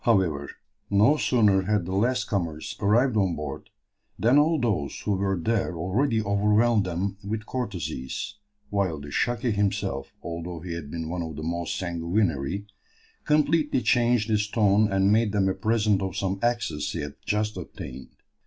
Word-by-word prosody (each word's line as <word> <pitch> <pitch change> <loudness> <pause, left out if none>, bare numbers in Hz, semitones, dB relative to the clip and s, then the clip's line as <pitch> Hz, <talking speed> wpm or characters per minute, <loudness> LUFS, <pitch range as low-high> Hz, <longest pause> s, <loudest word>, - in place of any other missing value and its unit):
However, 90 -11 +2 0.4
no 105 +9 +5
sooner 105 -9 +3
had 105 -1 0
the 95 - -4
last 120 +6 +2
comers 85 -6 -3
arrived 115 +5 +3
on 95 -5 +2
board 75 -2 -6 0.5
than 125 +6 +4
all 155 +1 +3
those 95 - -1
who - - -1
were 95 -1 0
there 95 -2 0
already 110 - +1
overwhelmed 105 +2 +3
them 95 +3 -2
with 110 +2 -3
courtesies, 100 - -4 0.3
while 95 -6 0
the 70 0 -9
"Shaki" 120 - 0
himself, 100 -9 -1
although 85 0 -5
he 85 0 -5
had 85 -4 -6
been 80 +1 -4
one 85 +2 -3
of 80 -2 -5
the 75 - -6
most 85 +1 -2
sanguinary, 85 0 -1 0.6
completely 150 -2 +2
changed 120 -3 +2
his 105 -1 +1
tone 105 -1 +3
and 95 +1 +3
made 110 -1 +2
them 100 -2 +2
a 95 - +2
present 105 0 +1
of 95 -1 -3
some 95 0 -1
axes 120 0 0
he - - -3
had 75 0 -5
just 105 +1 -1
obtained. 65 -7 -8
100 Hz, 160 wpm, -26 LUFS, 85-110 Hz, 0.6 s, no